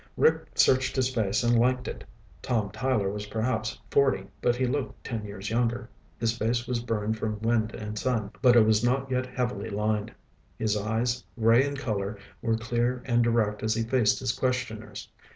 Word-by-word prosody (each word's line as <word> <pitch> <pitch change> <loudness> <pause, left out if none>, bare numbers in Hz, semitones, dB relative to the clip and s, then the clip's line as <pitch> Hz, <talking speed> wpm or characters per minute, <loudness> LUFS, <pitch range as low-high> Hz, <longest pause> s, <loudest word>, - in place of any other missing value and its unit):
Rick 465 - +3
searched 130 0 +3
his 130 -1 +1
face 110 -1 +1
and 120 0 +4
liked 125 +1 +2
it. - - -6 0.4
Tom 110 -5 -1
Tyler 125 -7 0
was 105 0 -5
perhaps 110 0 -2
forty, 135 -9 +3 0.2
but 120 - +2
he 130 +1 0
looked 130 +2 -3
ten 115 -3 -4
years 100 0 -6
younger. 120 +1 0 0.3
His 115 0 +1
face 120 +1 0
was 125 -2 -1
burned 110 -2 -2
from 110 -1 -2
wind 115 -1 +1
and 105 -1 -5
sun, 110 -5 -1
but 125 -2 +6
it 115 -2 +7
was 110 0 +3
not 130 +2 +1
yet 130 0 0
heavily 125 -5 -3
lined. 105 +2 -1 0.5
His 110 -1 0
eyes, 115 +4 -1 0.2
gray 115 +3 +5
in 140 0 -4
color, 105 -6 -2 0.2
were 115 -1 +1
clear 120 +2 -1
and 120 -2 +3
direct 110 -3 +1
as 110 0 +1
he 115 - 0
faced 115 -2 +2
his 130 -3 -1
questioners. 125 -4 -3
115 Hz, 185 wpm, -27 LUFS, 110-125 Hz, 0.5 s, it